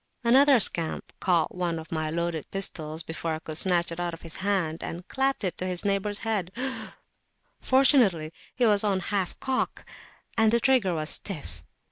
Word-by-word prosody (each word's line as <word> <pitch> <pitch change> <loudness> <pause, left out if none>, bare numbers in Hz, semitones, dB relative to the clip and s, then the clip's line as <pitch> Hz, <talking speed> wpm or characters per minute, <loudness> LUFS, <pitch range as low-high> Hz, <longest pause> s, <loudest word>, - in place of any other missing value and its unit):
Another 265 +2 +6
scamp 165 -5 0
caught 170 -4 +2
up - - -14
one 175 -2 -1
of 160 0 -9
my 155 -1 -1
loaded 170 -1 -3
pistols 160 -5 -2
before 160 0 -3
I - - -4
could 155 -1 -7
snatch 175 0 +3
it 165 - -6
out 175 -1 -2
of - - -18
his 165 - -5
hand, 185 -5 -1
and 175 +2 -7
clapped 270 -2 0
it 185 - -2
to 185 - -2
his 180 +1 0
neighbour's 200 +1 0
head; 200 -6 -1 1.1
fortunately, 240 - +4 0.2
it 245 - +3
was 210 -2 +4
on 200 -3 +1
half 190 0 -2
cock, 265 -1 -2 0.5
and 220 -1 +4
the 235 - +3
trigger 245 -9 +2
was 155 0 -1
stiff. 180 -8 -3
180 Hz, 180 wpm, -26 LUFS, 165-215 Hz, 1.1 s, Another